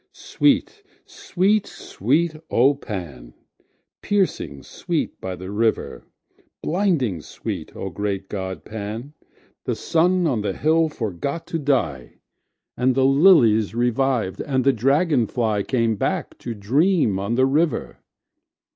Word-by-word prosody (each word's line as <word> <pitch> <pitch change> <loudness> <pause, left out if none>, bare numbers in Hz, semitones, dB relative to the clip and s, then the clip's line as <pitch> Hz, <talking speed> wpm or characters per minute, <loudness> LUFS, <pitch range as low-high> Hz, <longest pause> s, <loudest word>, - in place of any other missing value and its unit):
Sweet, 425 - 0 0.2
sweet, 195 +3 0
sweet, 155 - -1
O 130 +5 +4
Pan! 85 - -8 0.7
Piercing 190 - -1
sweet - - -4
by 95 -1 -4
the 95 +2 -8
river! 110 +2 -1 0.6
Blinding 155 - 0
sweet, - - -7
O 95 - -5
great 100 +1 -3
god 95 -2 -5
Pan! 110 +6 -6 0.5
The - - -1
sun 180 +2 +2
on 130 -9 +1
the 100 -2 -2
hill 160 +1 +2
forgot 140 - -4
to 165 - 0
die, 115 - -1 0.6
And 125 +1 +1
the 130 0 +3
lilies 135 - +5
reviv'd, 120 -3 0
and 130 -2 0
the 135 +1 +4
dragon 135 +1 +2
flyCame 115 0 0
back - - -2
to 120 -2 -5
dream 130 - +2
on 100 +4 -1
the 130 +1 +4
river. 150 +4 0
125 Hz, 120 wpm, -22 LUFS, 100-155 Hz, 0.7 s, lilies